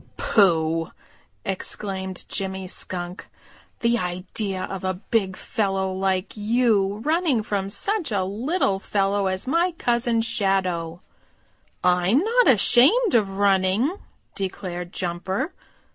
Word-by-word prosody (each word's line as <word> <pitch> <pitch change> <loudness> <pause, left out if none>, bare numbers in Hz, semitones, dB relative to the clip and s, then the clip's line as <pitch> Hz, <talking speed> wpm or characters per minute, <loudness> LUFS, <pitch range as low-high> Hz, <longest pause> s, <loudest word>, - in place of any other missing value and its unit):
"Pooh!" 165 -5 +2 0.6
exclaimed 190 -1 -4
Jimmy 190 -1 -4
Skunk. 180 0 -5 0.5
"The 235 0 +2
idea 185 +2 -3
of 195 -1 -5
a 185 0 -1
big 190 0 -1
fellow 195 -4 -1
like 190 0 -1
you 215 -2 +1
running 310 -7 +2
from 200 -2 -2
such 390 - -2
a 200 -3 +1
little 210 - 0
fellow 195 0 0
as 185 0 -2
my 335 +6 +1
Cousin 240 -6 +1
Shadow!" 185 -6 -1 0.8
"I'm 180 +5 +3
not 460 - +3
ashamed 270 - +5
of 195 -4 +2
running," 200 - +2 0.4
declared 185 -3 -5
Jumper. 190 - -3
195 Hz, 110 wpm, -24 LUFS, 185-235 Hz, 0.8 s, ashamed